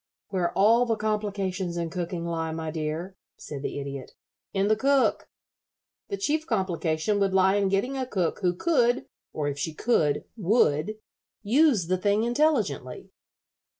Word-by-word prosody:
"Where 180 -3 0
all 230 +5 +5
the 225 - +2
complications 200 -4 -2
in 170 -1 -2
cooking 175 -1 -3
lie, 165 -1 -2
my 160 0 -4
dear," 160 +4 -4 0.2
said 140 -2 -7
the 145 - -4
Idiot, 140 -1 -7 0.4
"in 195 0 +1
the 215 - +4
cook. 275 +4 +2 0.8
The 400 - -3
chief 315 -4 -1
complication 185 -2 0
would 195 -1 +1
lie 190 0 +5
in 200 -1 +2
getting 200 +8 0
a 260 -1 -2
cook 185 -8 -1
who 180 -3 +1
could, 245 - +2 0.3
or 150 -1 -2
if 145 0 -3
she 155 +2 -3
could, 155 -11 +1
would, 205 -3 +2 0.5
use 245 - +3
the 185 +2 0
thing 205 +3 +2
intelligently." 235 - 0
190 Hz, 150 wpm, -26 LUFS, 165-225 Hz, 0.8 s, all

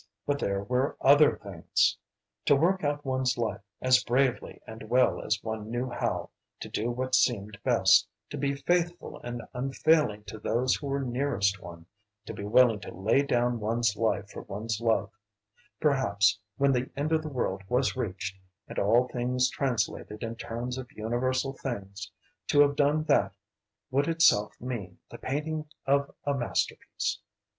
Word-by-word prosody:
But 145 0 0
there 100 -4 -1
were 125 +5 0
other 145 +2 +6
things! 95 -5 0 0.5
To 145 - +5
work 180 +6 +2
out 145 0 -1
one's 130 -1 0
life 110 -4 -2 0.2
as 130 0 +5
bravely 125 +1 0
and 110 -1 -10
well 125 0 +3
as 105 - +1
one 110 -1 -4
knew 120 +2 -2
how, - - -2 0.3
to - - -6
do 110 +3 -2
what 130 +2 -3
seemed 105 -5 +1
best, - - +5 0.2
to - - -4
be 140 0 0
faithful 175 +4 -1
and 120 -1 -5
unfailing 135 -3 +1
to 105 +1 -9
those 120 +4 +1
who 145 - -3
were 140 0 -1
nearest 120 -7 0
one, 85 -1 -10 0.4
to - - -6
be - - -7
willing 115 +1 +4
to - - -9
lay 105 +9 +2
down 120 -3 +1
one's 115 0 0
life 110 -3 0
for - - -7
one's 110 +2 -4
love, 110 -4 +1 0.7
perhaps 105 -9 +2 0.2
when 140 0 +3
the 125 0 0
end 150 +3 -1
of 160 -1 +3
the 155 - -6
world 100 -8 -2
was 125 +2 +1
reached, 100 -4 -3 0.3
and - - -4
all 115 +5 +3
things 125 +1 0
translated 115 -4 -2
in 115 0 -4
terms 120 +2 -5
of 130 0 -9
universal 130 +3 -1
things, 100 -8 -6 0.4
to 145 - +5
have 145 0 +4
done 150 +2 +2
that 150 -2 +2 0.6
would 140 +2 +2
itself 165 -11 +3
mean 115 -8 -5
the - - -9
painting 155 +3 -3 0.2
of 140 +1 +2 0.2
a 145 - +1
masterpiece. 125 -4 -2
125 Hz, 165 wpm, -28 LUFS, 110-140 Hz, 0.7 s, other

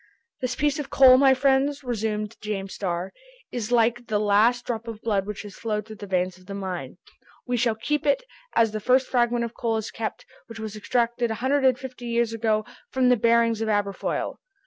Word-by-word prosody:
"This 255 -1 -2
piece 295 +1 0
of 280 -2 -5
coal, 260 -2 +7
my 270 -1 +6
friends," 275 +2 +2
resumed 220 -3 -2
James 195 -2 -4
Starr, 180 -1 -3 0.4
"is 240 -2 -4
like 240 0 +2
the 215 - +1
last 215 +4 +3
drop 230 -1 -4
of 225 -2 -6
blood 205 -3 0
which 210 0 -5
has 205 -2 -10
flowed 210 -1 -3
through 215 -1 -10
the 205 - -8
veins 185 -1 -1
of 185 - -21
the 200 - -6
mine! 180 -8 -5 0.5
We 245 - -1
shall 235 -2 +1
keep 295 +7 -2
it, 285 - +3 0.3
as 225 -2 +4
the 215 - -3
first 255 +4 +3
fragment 240 -1 +1
of 230 - -7
coal 225 -2 -1
is 220 0 -4
kept, 225 -1 -5 0.2
which 230 -1 -10
was 220 -1 -5
extracted 235 +2 0
a 220 - -2
hundred 265 +4 +1
and 255 -2 +4
fifty 255 -1 -8
years 235 -1 +1
ago 215 -1 0 0.2
from 255 -1 +2
the 250 - +6
bearings 230 0 +3
of 220 - -1
Aberfoyle. 205 -2 -1
230 Hz, 210 wpm, -25 LUFS, 210-250 Hz, 0.5 s, coal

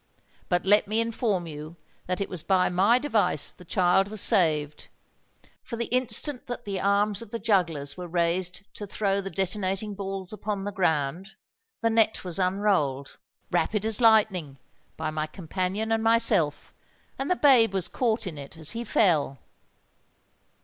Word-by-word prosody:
But 175 0 0
let 205 +1 +4
me 215 +2 0
inform 225 -5 -1
you 155 +1 -9 0.3
that 180 0 -2
it 200 - -2
was 180 -4 -5
by 185 0 +2
my 195 +7 +3
device 215 - +1
the 180 - -16
child 180 +2 +2
was 215 +1 -5
saved; 155 -9 +3 0.7
for 235 - -7
the 235 0 -3
instant 255 +2 -1
that 245 0 -6
the 195 -2 -3
arms 200 +1 +1
of 230 - -10
the 230 - -4
jugglers 170 -10 0
were 180 -1 -6
raised 180 +2 -1
to 205 - -7
throw 200 0 -1
the 195 - -6
detonating 195 +2 -2
balls 195 -1 -5
upon 210 -2 -4
the 205 - -4
ground, 175 0 -1 0.5
the 230 0 +1
net 225 -1 +2
was 180 0 -2
unrolled—rapid 185 +1 -1
as 220 +1 +1
lightning—by 160 - 0
my 155 0 -3
companion 185 +6 -3
and 225 0 +1
myself; 225 -10 +2 0.5
and 270 - -3
the 360 - +3
babe 255 - +5
was 190 -3 0
caught 230 -3 -1
in 160 -5 -6
it 140 +3 -10
as 160 -1 0
he 235 +1 -4
fell!" 160 - +1
195 Hz, 155 wpm, -26 LUFS, 170-220 Hz, 0.7 s, babe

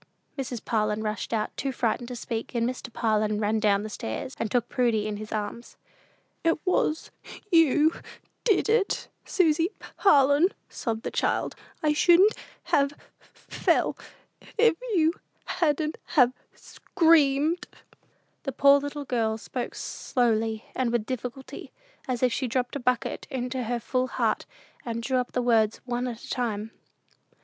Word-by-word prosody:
Mrs. 255 -4 -5
Parlin 215 -1 0
rushed 215 0 -3
out, 220 -2 -1
too 275 - -2
frightened 240 -1 -1
to 250 - -6
speak, 230 0 -5
and 235 0 +2
Mr. 250 -1 -5
Parlin 215 -2 +1
ran 215 +1 +1
down 210 0 +2
stairs, 210 - -5
and 225 - -1
took 245 -1 +1
Prudy 235 -4 +1
up - - -2
in 210 - -4
his 215 0 -8
arms. 215 +2 -5 0.7
"It 330 -1 +3
was 325 -3 0 0.4
you 315 -1 +5 0.5
did 425 -4 +3
it 440 -2 +1 0.2
Susy 330 -2 +2 0.3
Parlin," 290 0 +5 0.2
sobbed 225 -2 -3
the - - -3
child. - - 0 0.3
"I 300 -1 +3
shouldn't 355 +7 +6 0.3
have 280 0 +2 0.4
fell, - - 0 0.6
if 460 -2 +5 0.2
you 325 -1 +4 0.3
hadn't 310 -2 0 0.2
have 250 -4 +6 0.2
screamed." 320 -1 +2 0.7
The 270 - -3
poor 280 +2 +6
little 285 0 -5
girl 225 -4 0
spoke 245 +2 -5
slowly 225 -3 -1
and 250 -2 0
with 235 -3 0
difficulty, 255 +2 -6 0.4
as 255 -1 -2
if 250 -2 +3
she 260 +2 -1
dropped 250 +2 -1
a - - -2
bucket 250 -1 -1
into 255 -2 -3
her 240 +1 -1
full 255 +2 -1
heart, - - -1 0.4
and 230 -1 -4
drew 260 +2 +1
up 250 - -4
the 250 - 0
words 225 -3 +3
one 245 0 -2
at 235 -2 -6
a - - -10
time. 225 -3 -2
250 Hz, 150 wpm, -27 LUFS, 225-285 Hz, 0.7 s, shouldn't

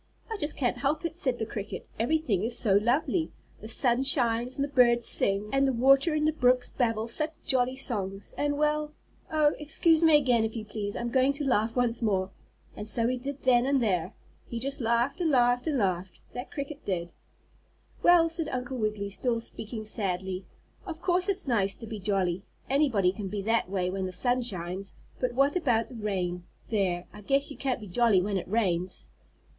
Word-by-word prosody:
"I 445 - -2
just 295 -4 -2
can't 245 -2 0
help 285 +5 -1
it," 335 - -3
said 260 -8 0
the 220 - -2
cricket. 210 -2 -6
"Everything 240 - +1
is 235 +2 -2
so 205 -5 +2
lovely. 255 - +1 0.3
The 215 - -9
sun 240 +2 +2
shines, 245 -2 +3
and 280 - -1
the - - -1
birds 240 -3 +4
sing, 200 +2 0
and 275 0 +3
the 265 - +1
water 275 +6 +4
in 305 0 +1
the 310 - +2
brooks 250 -4 +2
babble 225 -3 -1
such 305 +7 -3
jolly 255 -1 +1
songs, 200 -7 -3
and 290 0 -1
well 300 0 0 0.4
Oh, 305 -1 +3
excuse 315 +2 +3
me 320 -2 +7
again 250 -5 +2
if 220 +1 -3
you 220 -2 -5
please, 205 -1 -4
I'm 235 0 -3
going 265 +2 +3
to 285 +1 -3
laugh 225 -3 +1
once 245 -1 +1
more," 190 -4 0 0.4
and 210 - -4
so 230 +2 +4
he 255 - 0
did 275 +2 -6
then 250 -1 +4
and 275 0 +3
there. 185 -8 -1 0.3
He 235 - -5
just 275 +4 -1
laughed 235 +7 +1
and 335 - +2
laughed 245 -1 +3
and 300 -3 +1
laughed, 185 -4 -1
that 245 +2 -6
cricket 285 +1 -6
did. 175 -3 -3 0.9
"Well," 350 -1 +6
said 325 -1 -2
Uncle 255 +1 -4
Wiggily, 210 -3 -2
still 235 +3 -1
speaking 220 -1 -7
sadly, 190 -3 -3 0.4
"of 335 -5 -7
course 360 +2 +1
it's 385 -6 0
nice 200 -6 +2
to 230 - -10
be 220 -1 -6
jolly, 190 -2 0 0.2
anybody 260 -10 +2
can 195 +1 -6
be 200 0 -4
that 225 -1 +1
way 185 -2 -1
when 190 0 -2
the - - -6
sun 245 +7 +1
shines, 190 -3 -4 0.3
but 250 -1 -1
what 275 +4 +3
about 245 -10 +1
the 250 - -10
rain? 185 -5 -3 0.3
There! 185 -5 0
I 210 - -11
guess 275 +7 0
you - - -9
can't 265 -3 -1
be 215 - -9
jolly 215 +1 +3
when 195 +2 -1
it 185 - -5
rains." 185 -4 -1
240 Hz, 200 wpm, -28 LUFS, 205-275 Hz, 0.9 s, me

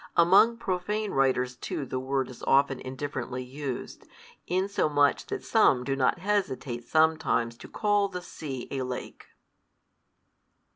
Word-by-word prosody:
Among 195 +7 +6
profane 205 +2 -2
writers 130 -2 +1
too 135 +3 -4
the 130 - -3
word 130 0 -1
is 125 - -13
often 135 -1 +3
indifferently 130 -1 -5
used, 130 0 -6 0.4
insomuch 165 -6 +1
that 405 -1 -4
some 135 - +4
do 135 +1 -1
not 135 +3 +2
hesitate 150 - -2
sometimes 155 -7 +2
to - - -11
call 205 -1 +1
the 180 -2 -7
sea 135 -8 -6
a 135 - -2
lake. 125 -1 -6
140 Hz, 130 wpm, -28 LUFS, 130-185 Hz, 0.4 s, Among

